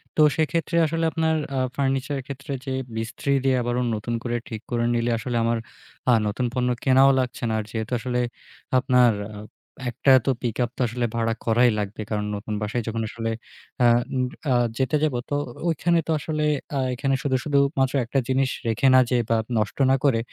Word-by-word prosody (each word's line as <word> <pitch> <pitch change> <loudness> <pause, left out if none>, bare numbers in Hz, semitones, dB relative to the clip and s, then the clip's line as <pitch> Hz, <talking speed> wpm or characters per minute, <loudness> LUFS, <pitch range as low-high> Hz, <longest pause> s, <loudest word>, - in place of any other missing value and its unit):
তো - - +3 0.2
সেক্ষেত্রে 165 +2 0
আসলে 165 +1 -1
আপনার 160 0 +1 0.2
আ - - +2 0.2
ফার্নিচার 135 0 0
এর 135 - -5
ক্ষেত্রে 140 +1 -6
যে 135 - -2 0.2
মিস্ত্রি 115 +5 -3
দিয়ে 135 -1 +3
আবারো 120 +1 -1 0.2
নতুন 110 +3 -4
করে 120 -1 -2
ঠিক 110 -3 -6
করে 120 -1 +1
নিলে 120 0 +1
আসলে 120 +1 -2
আমার 115 0 +1 0.5
আ - - +6
নতুন 110 +5 -1
পণ্য 125 -1 0
কেনাও 135 0 +6
লাগছে 125 -1 -3
না। - - 0
আর - - -2
যেহেতু 110 0 -4
আসলে 125 +1 -2 0.6
আপনার 125 -1 +4 0.2
আ - - -8 0.5
একটা 130 +3 +2
তো 135 - +3
পিকআপ 120 0 -1
তো - - -3
আসলে 120 +1 -2
ভাড়া 115 -1 +1
করাই 120 +2 +4
লাগবে। 105 +1 -4
কারণ 105 -1 -1
নতুন 105 +1 -5
বাসায় 110 +3 -2
যখন 115 0 -2
আসলে 115 0 -3 0.5
আ - - +6 0.3
উম 130 -1 +1 0.3
আ - - +4 0.2
যেতে 130 +2 +1
যাব 155 -3 +2 0.2
তো 145 - 0 0.3
ওইখানে 170 +1 +2
তো - - 0
আসলে 155 +1 -2 0.3
আ - - +1
এখানে 135 +2 0
শুধু, 135 -2 +1
শুধু 145 -2 +1 0.2
মাত্র 135 -1 +2
একটা 135 +4 0
জিনিস 130 0 +2 0.2
রেখে 115 +4 +2
না 130 - +8
যেয়ে 125 -2 +2
বা 115 - +3 0.2
নষ্ট 105 -2 -1
না - - +5
করে 135 -6 +3
125 Hz, 195 wpm, -24 LUFS, 115-135 Hz, 0.6 s, না